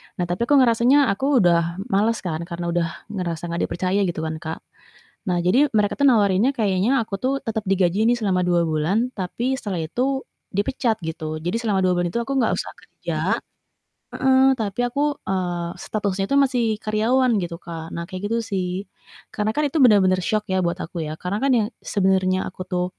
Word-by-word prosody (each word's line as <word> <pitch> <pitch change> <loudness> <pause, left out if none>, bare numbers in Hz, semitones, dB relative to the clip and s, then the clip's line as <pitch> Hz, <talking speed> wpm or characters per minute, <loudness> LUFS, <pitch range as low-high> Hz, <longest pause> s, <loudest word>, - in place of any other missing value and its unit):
Nah, 180 - -2
tapi 205 +7 -1
kok 290 - +4
ngerasanya 255 +2 +4
aku 260 +3 +2
udah 170 -1 +2 0.2
males 215 +3 +1
kan 160 -3 -3
karena 170 -1 -4
udah 170 -1 +1 0.2
ngerasa 175 -4 -4
gak 170 - -2
dipercaya 185 +3 -1
gitu 165 -2 -3
kan 160 0 -3
Kak. 160 0 -6 0.6
Nah, 175 -1 0
jadi 250 +12 +4
mereka 210 +3 +1
tuh 280 - +5
nawarin 210 -2 +4
nya - - +3
kayaknya 220 +4 +1
aku 195 -3 -6
tuh 260 +2 0
tetep 220 -2 -3
digaji 195 +2 +2
nih 245 - +4
selama 200 -5 0
2 175 -1 +3
bulan 170 +10 0
tapi 240 +6 -2
setelah 185 -6 -3
itu 265 - -1 0.3
dipecat 225 +3 0
gitu. 155 -1 -4
Jadi 175 +6 -1
selama 205 -5 0
2 185 - +3
bulan 175 0 0
itu 235 - -1
aku 275 +3 -4
gak 235 - +2
usah - - -4
kerja - - -6 1.0
heeh. 265 0 +4
Tapi 215 -3 -3
aku, 285 +4 0
eee, 175 -2 -2
statusnya 200 -2 -2
itu 280 - +3
masih 260 -3 +2
karyawan 230 +5 +1
gitu, 170 -1 -4
Kak. 165 -2 -8
Nah 170 - -3
kayak 190 +2 -5
gitu 230 - +1
sih. 190 -2 -3 0.5
Karena 210 0 0
kan 300 - +2
itu 300 - -2
bener-bener 190 -5 +5
syok 215 +2 0
ya 190 - +2
buat 170 - 0
aku 165 0 -5
ya 155 - -4
karena 185 +3 -3
kan 275 - +2
ya 220 - +2 0.2
sebenernya 190 -2 +1
aku 185 - -8
tuh 180 0 0
195 Hz, 195 wpm, -22 LUFS, 175-235 Hz, 1.0 s, tuh